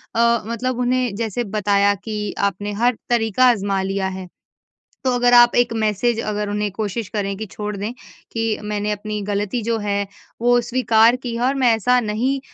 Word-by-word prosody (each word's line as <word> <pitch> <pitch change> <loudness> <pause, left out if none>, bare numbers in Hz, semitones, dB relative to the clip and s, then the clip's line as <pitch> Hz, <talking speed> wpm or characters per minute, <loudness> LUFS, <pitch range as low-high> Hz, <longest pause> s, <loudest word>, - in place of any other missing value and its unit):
अ, 235 0 +3
मतलब 245 +2 -2
उन्हें 250 -3 0
जैसे 230 +2 -2
बताया 200 0 +3
कि 210 -2 -4 0.2
आपने 205 +2 -6
हर 245 -1 +3
तरीका 235 0 +2
आज़मा 200 -4 0
लिया 195 0 -1
है। 185 - -8 0.8
तो 260 - +2
अगर 245 0 +3
आप 240 0 +7
एक 245 -1 +3
मैसेज 220 +1 0
अगर 210 -1 -3
उन्हें 210 0 -1
कोशिश 210 +1 -3
करें 200 -2 -3
कि 220 +2 -5
छोड़ 210 0 -5
दें 205 +4 -4 0.4
कि 225 -1 -1
मैंने 210 0 -2
अपनी 210 0 -4
गलती 205 +3 -2
जो 230 +1 0
है 200 -1 -1 0.3
वो 245 +1 +4
स्वीकार 235 -1 +3
की 245 -2 -6
है 235 - -3
और 270 - +1
मैं 255 -3 +3
ऐसा 250 +3 +2
नहीं 240 +5 -1
220 Hz, 180 wpm, -20 LUFS, 205-240 Hz, 0.8 s, आप